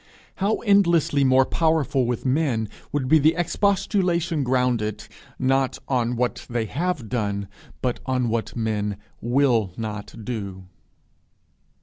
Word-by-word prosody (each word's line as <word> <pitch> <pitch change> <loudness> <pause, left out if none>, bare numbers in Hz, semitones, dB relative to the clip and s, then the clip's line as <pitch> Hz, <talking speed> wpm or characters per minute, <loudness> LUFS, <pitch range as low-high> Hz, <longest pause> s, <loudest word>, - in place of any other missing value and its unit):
How 200 +3 +1
endlessly 170 -9 +3
more 130 0 +5
powerful 150 -6 +1
with 120 0 -2
men 130 -6 +1 0.2
would 140 -3 -1
be 155 +2 +5
expostulation 175 -3 +1
grounded, 125 -4 0 0.3
not 135 0 +1
on 125 -2 0
what 125 +1 -2
they 120 -2 -1
have 150 -1 -2
done, 100 -4 -2 0.4
but 125 -2 0
on 130 -2 +1
what 115 0 -1
they 105 -3 -1 0.3
will 120 -5 +2
not 105 0 -6
do! 100 -6 -5
130 Hz, 115 wpm, -24 LUFS, 115-155 Hz, 0.4 s, more